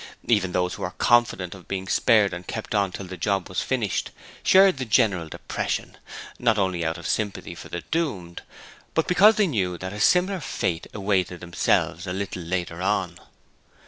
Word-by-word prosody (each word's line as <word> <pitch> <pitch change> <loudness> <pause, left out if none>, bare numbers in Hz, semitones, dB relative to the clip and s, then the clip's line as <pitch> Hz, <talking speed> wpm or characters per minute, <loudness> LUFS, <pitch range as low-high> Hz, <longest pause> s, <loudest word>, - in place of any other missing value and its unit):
Even 100 -5 +2
those 90 0 0
who - - -8
were - - -2
confident 120 -7 +2
of 95 -3 -14
being 95 -1 -4
spared 105 -1 +3
and 90 0 -7
kept 110 - -5
on 100 -3 +1
till 95 - -7
the 90 0 -7
job 95 +2 0
was 90 - -2
finished 120 -7 -1 0.3
shared 190 -4 +6
the - - -1
general 100 -8 +2
depression, - - -4 0.4
not 115 -3 +2
only 95 -4 0
out 80 +1 -1
of 85 - -10
sympathy 105 +2 -2
for - - -11
the 85 - -4
doomed, 105 - -2 0.5
but 160 - +2
because 205 +5 +6
they 210 - +3
knew 95 - -1
that 95 +2 -6
a 105 - -6
similar 180 - +3
fate 85 - -2
awaited 95 -3 0
themselves 85 0 0
a 90 - -2
little 95 -1 -4
later 85 +1 -3
on. - - -1
95 Hz, 180 wpm, -24 LUFS, 90-115 Hz, 0.5 s, shared